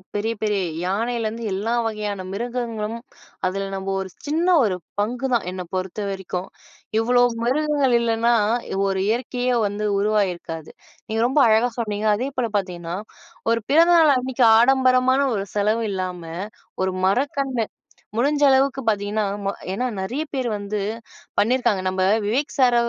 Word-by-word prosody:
பெரிய 220 Hz, +3 st, 0 dB
பெரிய 210 Hz, -3 st, +1 dB, 0.2 s
யானையிலருந்து 225 Hz, +3 st, -2 dB
எல்லா 205 Hz, +5 st, -2 dB
வகையான 210 Hz, -3 st, -3 dB
மிருகங்களும் 230 Hz, 0 st, -3 dB, 0.5 s
அதில 195 Hz, +1 st, -2 dB
நம்ம 190 Hz, 0 st, -5 dB
ஒரு 190 Hz, -, -6 dB, 0.2 s
சின்ன 315 Hz, +4 st, 0 dB, 0.2 s
ஒரு 200 Hz, -5 st, +1 dB, 0.2 s
பங்குதான் 240 Hz, -1 st, 0 dB
என்ன 185 Hz, 0 st, -5 dB
பொறுத்த 185 Hz, +2 st, -3 dB
வரைக்கும். 190 Hz, -1 st, -4 dB, 0.5 s
இவ்ளோ 245 Hz, +2 st, +4 dB, 0.2 s
மிருகங்கள் 280 Hz, 0 st, +2 dB
இல்லன்னா, 235 Hz, 0 st, +2 dB, 0.5 s
ஒரு 190 Hz, -1 st, 0 dB
இயற்கையே 250 Hz, +2 st, 0 dB
வந்து 205 Hz, +1 st, -3 dB
உருவாகியிருக்காது. 185 Hz, -6 st, -1 dB, 0.4 s
நீங்க 220 Hz, +1 st, -2 dB
ரொம்ப 265 Hz, +4 st, +2 dB
அழகா 225 Hz, +3 st, +4 dB
சொன்னீங்க. 210 Hz, -2 st, -2 dB
அதே 250 Hz, +6 st, -2 dB
போல 240 Hz, -2 st, +1 dB
பார்த்தீங்கன்னா, 175 Hz, -3 st, -4 dB, 0.6 s
ஒரு 230 Hz, -, +2 dB
பிறந்தநாள் 325 Hz, 0 st, +6 dB
அன்னக்கி 255 Hz, -1 st, +1 dB
ஆடம்பரமான 260 Hz, +1 st, +4 dB
ஒரு 195 Hz, 0 st, -2 dB
செலவு 215 Hz, +3 st, +1 dB
இல்லாம 185 Hz, -2 st, -3 dB, 0.6 s
ஒரு 190 Hz, -, +1 dB, 0.2 s
மரக்கன்று 260 Hz, +2 st, 0 dB, 0.5 s
முடிஞ்ச 285 Hz, +5 st, +1 dB
அளவுக்கு 270 Hz, 0 st, +3 dB
பார்த்தீங்கன்னா 210 Hz, 0 st, 0 dB, 0.3 s
அ -, -, +2 dB, 0.2 s
ஏன்னா 250 Hz, +6 st, -1 dB
நிறைய 245 Hz, +11 st, -2 dB
பேர் 255 Hz, -3 st, -1 dB
வந்து 205 Hz, +1 st, -3 dB, 0.6 s
பண்ணியிருக்காங்க. 225 Hz, -3 st, +2 dB
நம்ப 185 Hz, 0 st, -1 dB, 0.2 s
விவேக் 265 Hz, +8 st, 0 dB
சார 250 Hz, -2 st, +5 dB
225 Hz, 130 wpm, -22 LUFS, 200-255 Hz, 0.6 s, பிறந்தநாள்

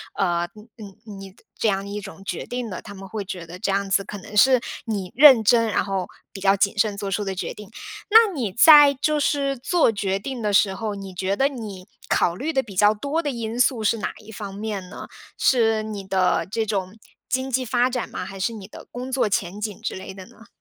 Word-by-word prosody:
呃， 175 Hz, -2 st, 0 dB
你 210 Hz, -, -14 dB, 0.2 s
你 205 Hz, +2 st, -13 dB
你 195 Hz, -1 st, -10 dB
的 -, -, -25 dB, 0.2 s
这 225 Hz, -, +1 dB
样 195 Hz, -1 st, 0 dB
一 205 Hz, +1 st, -5 dB
种 195 Hz, -1 st, -11 dB
决 -, -, -5 dB
定 245 Hz, -2 st, -4 dB
的。 185 Hz, -, -6 dB
他 200 Hz, -, -10 dB
们 195 Hz, 0 st, -10 dB
会 210 Hz, -1 st, -5 dB
觉 180 Hz, -2 st, -6 dB
得 175 Hz, +2 st, -10 dB
这 200 Hz, -, -2 dB
样 200 Hz, 0 st, -1 dB
子 195 Hz, +1 st, +2 dB
可 205 Hz, -, -7 dB
能 215 Hz, +2 st, -11 dB
是 255 Hz, +1 st, +6 dB, 0.2 s
你 200 Hz, -5 st, -4 dB
认 265 Hz, -5 st, +8 dB
真， 230 Hz, +1 st, +4 dB
然 205 Hz, -, 0 dB
后 190 Hz, -2 st, -3 dB, 0.2 s
比 195 Hz, -, -9 dB
较 195 Hz, +1 st, +3 dB
谨 200 Hz, +2 st, 0 dB
慎 210 Hz, 0 st, +2 dB
做 200 Hz, -1 st, -5 dB
出 205 Hz, +1 st, -1 dB
的 195 Hz, -1 st, -3 dB
决 185 Hz, -, -4 dB
定。 210 Hz, -2 st, -12 dB, 0.4 s
那 440 Hz, -1 st, +6 dB
你 235 Hz, -, -3 dB
在 290 Hz, +4 st, +8 dB
就 300 Hz, +3 st, 0 dB
是 280 Hz, -2 st, 0 dB
做 295 Hz, +2 st, +2 dB
决 195 Hz, -2 st, -1 dB
定 255 Hz, +4 st, -6 dB
的 210 Hz, -2 st, -1 dB
时 195 Hz, -1 st, +4 dB
候， 215 Hz, 0 st, -4 dB
你 195 Hz, -1 st, -8 dB
觉 190 Hz, +2 st, -1 dB
得 275 Hz, +5 st, +2 dB
你 210 Hz, -8 st, -8 dB, 0.2 s
考 170 Hz, -, +1 dB
虑 300 Hz, -, -3 dB
得 265 Hz, -, +1 dB
比 205 Hz, -4 st, -12 dB
较 205 Hz, +3 st, +5 dB
多 285 Hz, +9 st, -2 dB
的 295 Hz, -, -2 dB
因 230 Hz, -1 st, -5 dB
素 250 Hz, -3 st, +2 dB
是 220 Hz, +2 st, +2 dB
哪 210 Hz, -, -4 dB
一 220 Hz, -, -12 dB
方 200 Hz, -1 st, -7 dB
面 205 Hz, -3 st, -5 dB
呢？ -, -, -9 dB, 0.3 s
是 225 Hz, -4 st, +2 dB
你 210 Hz, -2 st, -6 dB
的 190 Hz, -1 st, +1 dB
这 225 Hz, +1 st, -1 dB
种 195 Hz, -2 st, -3 dB, 0.3 s
经 260 Hz, +1 st, -1 dB
济 255 Hz, +1 st, 0 dB
发 245 Hz, +1 st, +2 dB
展 250 Hz, -2 st, -3 dB
吗？ -, -, -5 dB
还 195 Hz, 0 st, -9 dB
是 230 Hz, +5 st, -1 dB
你 200 Hz, -3 st, -9 dB
的 -, -, -12 dB
工 250 Hz, +2 st, -7 dB
作 260 Hz, -4 st, +1 dB
前 195 Hz, -1 st, -2 dB
景 210 Hz, -2 st, -5 dB
之 -, -, -3 dB
类 190 Hz, +1 st, -8 dB
的 190 Hz, -1 st, -11 dB
呢？ 230 Hz, -1 st, -18 dB
210 Hz, 260 characters per minute, -23 LUFS, 195-245 Hz, 0.4 s, 认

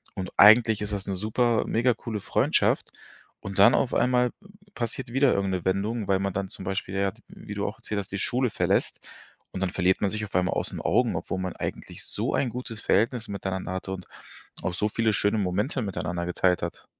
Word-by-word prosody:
Und 90 Hz, -1 st, -4 dB
eigentlich 110 Hz, 0 st, +7 dB
ist 105 Hz, 0 st, -3 dB
das 100 Hz, -1 st, -3 dB
'ne 95 Hz, -, -1 dB
super 110 Hz, +4 st, +1 dB
mega 120 Hz, +2 st, +2 dB
coole 110 Hz, -2 st, -5 dB
Freundschaft. -, -, +1 dB, 0.5 s
Und 100 Hz, 0 st, -6 dB
dann 115 Hz, +5 st, +8 dB
auf 125 Hz, -, +1 dB
einmal 125 Hz, 0 st, +3 dB, 0.4 s
passiert 115 Hz, 0 st, -4 dB
wieder 135 Hz, +1 st, +4 dB
irgendeine 95 Hz, -3 st, -1 dB
Wendung, 100 Hz, +3 st, -1 dB
weil 95 Hz, -1 st, +2 dB
man 100 Hz, 0 st, -1 dB
dann 95 Hz, 0 st, -3 dB
zum -, -, -9 dB
Beispiel, 95 Hz, 0 st, -3 dB
ja, 100 Hz, 0 st, +1 dB
d -, -, -23 dB
wie -, -, -9 dB
du -, -, -2 dB
auch -, -, -4 dB
erzählt 105 Hz, -1 st, -4 dB
hast, 95 Hz, -, -7 dB
die 95 Hz, -, -2 dB
Schule 125 Hz, +4 st, +1 dB
verlässt, -, -, 0 dB, 0.5 s
und 95 Hz, -, -5 dB
dann 95 Hz, -, 0 dB
verliert 95 Hz, 0 st, +1 dB
man 100 Hz, -, +2 dB
sich 105 Hz, +1 st, -3 dB
auf 105 Hz, -, -7 dB
einmal 90 Hz, 0 st, +2 dB
aus -, -, -2 dB
'n -, -, -5 dB
Augen, -, -, +2 dB
obwohl 95 Hz, -, -4 dB
man 95 Hz, -1 st, -4 dB
eigentlich -, -, -6 dB
so -, -, -2 dB
ein 130 Hz, -, +1 dB
gutes 120 Hz, -2 st, -6 dB
Verhältnis 115 Hz, +2 st, +1 dB
miteinander 95 Hz, -3 st, -4 dB
hatte 95 Hz, +1 st, -4 dB
und 95 Hz, -1 st, -6 dB, 0.6 s
auch 90 Hz, -, -2 dB
so 105 Hz, +4 st, 0 dB
viele 110 Hz, +1 st, +1 dB
schöne 100 Hz, +3 st, +1 dB
Momente 105 Hz, -, -1 dB
miteinander 90 Hz, -3 st, -3 dB
geteilt 90 Hz, +1 st, +1 dB
hat. -, -, -6 dB
100 Hz, 210 wpm, -26 LUFS, 95-115 Hz, 0.6 s, dann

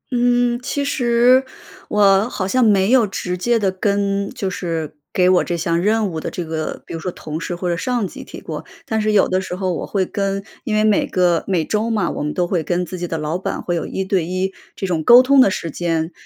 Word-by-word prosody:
嗯， 245 Hz, 0 st, +2 dB
其 280 Hz, +2 st, -2 dB
实 245 Hz, 0 st, +3 dB, 0.5 s
我 205 Hz, +1 st, +4 dB
好 190 Hz, -, -3 dB
像 255 Hz, +6 st, +2 dB
没 200 Hz, -1 st, +3 dB
有 250 Hz, -4 st, +5 dB
直 180 Hz, -2 st, -3 dB
接 235 Hz, +6 st, +1 dB
地 200 Hz, -4 st, +1 dB
跟 200 Hz, +1 st, 0 dB
就 195 Hz, -, -4 dB
是 165 Hz, -5 st, -4 dB, 0.2 s
给 180 Hz, -1 st, +2 dB
我 185 Hz, -, +4 dB
这 175 Hz, -, -2 dB
项 170 Hz, +1 st, 0 dB
任 215 Hz, +1 st, +1 dB
务 160 Hz, -3 st, -4 dB
的 -, -, -4 dB
这 175 Hz, -, -4 dB
个 160 Hz, -1 st, -4 dB
比 -, -, -7 dB
如 165 Hz, -, -5 dB
说 180 Hz, +3 st, -4 dB
同 155 Hz, -1 st, -6 dB
事 175 Hz, -, -3 dB
或 180 Hz, +1 st, -4 dB
者 170 Hz, -, +1 dB
上 240 Hz, +1 st, -1 dB
级 -, -, -10 dB
提 -, -, -10 dB
过， -, -, -6 dB, 0.2 s
但 220 Hz, -6 st, -1 dB
是 215 Hz, 0 st, +1 dB
有 205 Hz, -2 st, +4 dB
的 185 Hz, 0 st, 0 dB
时 180 Hz, -1 st, -5 dB
候 185 Hz, -1 st, -1 dB
我 -, -, -4 dB
会 190 Hz, -2 st, 0 dB
跟 195 Hz, 0 st, -2 dB, 0.2 s
因 220 Hz, -4 st, -1 dB
为 215 Hz, -, +3 dB
每 215 Hz, -2 st, +3 dB
个 175 Hz, -3 st, +2 dB
每 180 Hz, -5 st, 0 dB
周 215 Hz, +5 st, -1 dB
嘛， 220 Hz, -3 st, 0 dB
我 -, -, -5 dB
们 150 Hz, -, -2 dB
都 180 Hz, -, +1 dB
会 175 Hz, -2 st, 0 dB
跟 175 Hz, +3 st, -1 dB
自 180 Hz, 0 st, -7 dB
己 175 Hz, -, -3 dB
的 165 Hz, -, -3 dB
老 155 Hz, +3 st, -2 dB
板 -, -, -4 dB
会 175 Hz, -, -1 dB
有 165 Hz, -, -3 dB
1 190 Hz, -, -3 dB
对 190 Hz, -3 st, +1 dB
1 185 Hz, +2 st, -2 dB, 0.2 s
这 -, -, -4 dB
种 170 Hz, -4 st, -1 dB
沟 245 Hz, +8 st, +8 dB
通 275 Hz, +1 st, +5 dB
的 200 Hz, -, +5 dB
时 165 Hz, -3 st, -4 dB
间。 165 Hz, 0 st, -1 dB
190 Hz, 260 characters per minute, -19 LUFS, 175-215 Hz, 0.5 s, 沟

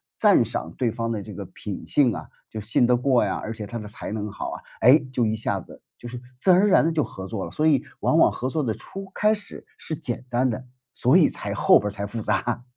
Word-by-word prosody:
赞 -, -, +5 dB
赏 80 Hz, -, -4 dB
对 120 Hz, -3 st, +1 dB
方 115 Hz, 0 st, -3 dB
的 105 Hz, -3 st, -2 dB
这 -, -, -9 dB
个 -, -, -6 dB
品 -, -, -7 dB
性 130 Hz, -7 st, +3 dB
啊， -, -, -7 dB, 0.2 s
就 110 Hz, -, -6 dB
信 115 Hz, +3 st, +2 dB
得 125 Hz, -, +4 dB
过 125 Hz, -3 st, +2 dB
呀， 95 Hz, -, -1 dB
而 110 Hz, -, -5 dB
且 105 Hz, -2 st, -7 dB
他 120 Hz, -, -5 dB
的 105 Hz, -, -7 dB
才 110 Hz, -, -7 dB
能 105 Hz, -1 st, -4 dB
好 100 Hz, -, -5 dB
啊， -, -, -7 dB, 0.2 s
哎， 130 Hz, +6 st, +7 dB
就 120 Hz, -3 st, +1 dB
一 110 Hz, 0 st, 0 dB
下 110 Hz, -, -1 dB
子， -, -, -14 dB, 0.2 s
就 120 Hz, -, -9 dB
是 120 Hz, 0 st, -7 dB, 0.2 s
自 185 Hz, +8 st, +3 dB
然 185 Hz, -, +5 dB
而 210 Hz, -, +4 dB
然 160 Hz, -, +5 dB
地 165 Hz, -, +1 dB
就 155 Hz, -, +2 dB
合 95 Hz, 0 st, -7 dB
作 105 Hz, -3 st, -4 dB
了。 -, -, -6 dB
所 155 Hz, +1 st, +1 dB
以 140 Hz, -2 st, +3 dB, 0.2 s
往 160 Hz, -, +2 dB
往 -, -, +6 dB
合 130 Hz, +2 st, -3 dB
作 155 Hz, +1 st, -1 dB
的 110 Hz, -3 st, 0 dB
初 195 Hz, -, -9 dB
开 215 Hz, +1 st, +3 dB
始 210 Hz, -2 st, -7 dB
是 155 Hz, -, -5 dB
简 120 Hz, -2 st, -5 dB
单 125 Hz, +2 st, +2 dB
的， 125 Hz, +3 st, -4 dB, 0.3 s
所 -, -, +4 dB
以 -, -, +6 dB
才 -, -, -5 dB
后 -, -, +6 dB
边 105 Hz, -, -3 dB
儿 -, -, 0 dB
才 100 Hz, 0 st, -5 dB
复 110 Hz, +2 st, -5 dB
杂。 115 Hz, +4 st, -1 dB
120 Hz, 290 characters per minute, -24 LUFS, 110-140 Hz, 0.3 s, 哎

